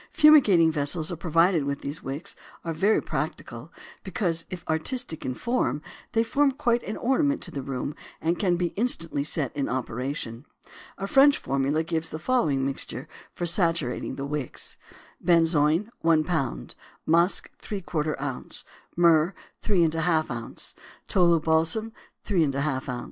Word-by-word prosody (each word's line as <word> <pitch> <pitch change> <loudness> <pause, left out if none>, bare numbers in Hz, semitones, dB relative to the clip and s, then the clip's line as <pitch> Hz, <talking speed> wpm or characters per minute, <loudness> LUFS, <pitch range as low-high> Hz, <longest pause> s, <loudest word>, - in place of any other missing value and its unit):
Fumigating 215 - +6
vessels 155 +2 0
provided 165 0 +3
with 140 0 -3
these 145 +2 -4
wicks 140 +5 -5 0.3
are 165 - -2
very 195 +7 +2
practical - - -5 0.3
because, 170 -6 -2
if 180 -2 -8
artistic 160 - -2
in 130 - -3
form, 230 - 0 0.3
they 225 -1 +3
form 280 +4 +2
quite 240 -4 +1
an 215 - -5
ornament 280 +3 +1
to 175 - -9
the 140 - -4
room 135 +2 -4 0.3
and 170 +2 0
can 180 -4 +2
be 175 -1 -1
instantly 165 - 0
set 150 -3 -1
in 140 -2 -1
operation. 125 -1 -3 0.5
A 195 - -3
French 280 +7 +5
formula 140 +3 0
gives 165 0 -2
the 155 - -5
following 155 - +1
mixture 135 0 -4 0.3
for 175 - -2
saturating 165 -7 +1
the 140 - -4
wicks: 145 -3 -3 0.5
Benzoin 165 +3 +3
1 160 -1 +3
lb. 140 - -2 0.3
Musk 170 +4 +2
¾ 165 -6 -2
oz. 135 -2 -1 0.3
Myrrh 170 +1 +4 0.3
3½ 165 -5 +1
oz. 120 -1 -5 0.3
Tolu 170 -3 +4
balsam 165 +8 +1 0.3
3½ 145 -7 0
oz. 125 -1 -3
165 Hz, 140 wpm, -26 LUFS, 145-190 Hz, 0.5 s, Fumigating